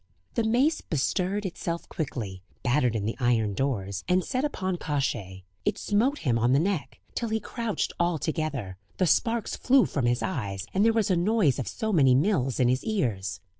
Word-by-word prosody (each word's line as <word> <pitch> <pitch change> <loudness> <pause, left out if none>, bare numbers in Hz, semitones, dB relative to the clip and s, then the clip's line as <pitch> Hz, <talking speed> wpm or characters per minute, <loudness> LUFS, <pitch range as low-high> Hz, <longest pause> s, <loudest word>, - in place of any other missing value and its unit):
The 230 - +1
mace 255 +8 +2
bestirred 185 +6 -1
itself 170 -2 -4
quickly, 110 - -4 0.2
battered 125 -2 +2
in 105 -2 -1
the 110 - -1
iron 115 -4 +2
doors, 100 -6 -2
and 180 0 +3
set 255 0 -1
upon 190 -11 -1
Kosciey; 115 - -2 0.2
it - - 0
smote 240 +8 +1
him 120 -3 +2
on 120 +3 +3
the 135 - +5
neck, 180 -2 -2
till 235 - -2
he 220 0 0
crouched 230 -2 -3
all 170 -1 +2
together, 140 - -3 0.2
the 185 - +3
sparks 230 - +1
flew 265 0 +4
from 135 -5 -1
his 120 0 +1
eyes, 100 - -3
and 195 - +3
there 225 - +5
was 220 -3 +1
a - - +4
noise 175 - +2
of 130 - -3
so 220 -1 -2
many 135 -7 +5
mills 135 - +1
in 125 - +4
his 130 +2 +1
ears. 100 - -1
155 Hz, 190 wpm, -27 LUFS, -, 0.2 s, the